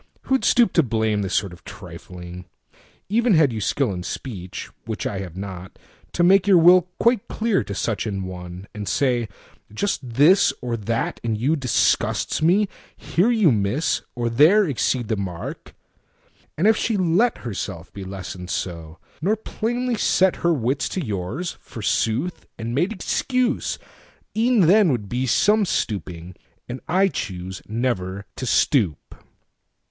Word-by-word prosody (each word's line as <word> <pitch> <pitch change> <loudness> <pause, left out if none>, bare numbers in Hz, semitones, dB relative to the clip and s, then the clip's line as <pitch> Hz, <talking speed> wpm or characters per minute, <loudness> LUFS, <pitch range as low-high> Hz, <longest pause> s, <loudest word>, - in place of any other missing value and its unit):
Who'd 265 0 +1
stoop 235 -6 +4
to 165 - +5
blameThis 110 - 0
sort 100 -2 -1
of 85 - -15
trifling? 90 -2 -10 0.6
Even 225 0 +3
had 150 -6 +4
you 110 - -3
skillIn 100 -4 -1
speech—(which 95 -4 -6
I 100 - -2
have 90 -3 -7
not)—to 95 - -6
make 190 +2 +5
your 190 -3 +7
willQuite 180 +6 +4
clear 220 - 0
to 100 0 -6
such 105 0 -2
an 100 -2 -3
one, 90 0 -8
and 105 -2 -5
say, 120 -5 +1 0.4
"Just 130 - -2
thisOr 135 - +3
that 115 0 -1
in 115 -2 -1
you 130 +9 +1
disgusts 135 +2 +1
me; 190 +6 +4 0.3
here 185 +7 +1
you 220 - +4
miss, 110 +8 0
Or 120 -1 -1
there 155 - +5
exceed 125 -3 0
the 110 - 0
mark"—and 95 - -8
if 220 +1 +6
she 220 0 0
letHerself 165 - -1
be 100 - -7
lessoned 95 -1 -7
so, 85 -3 -4 0.2
nor 200 +7 +2
plainly 240 +2 -2
setHer 175 -5 +2
wits 130 +5 0
to 180 -6 -3
yours, 105 - -3
forsooth, 115 - -2
and 115 +1 -4
made 175 - +1
excuse,—E'en 240 0 -1
then 185 +1 +5
would 110 -6 -2
be 125 +5 -2
some 210 - +3
stooping; 90 - -3 0.3
and 125 +2 -6
I 190 +4 +3
chooseNever 95 - -3
to 130 - -4
stoop. 105 - +1
120 Hz, 130 wpm, -22 LUFS, -, 0.6 s, your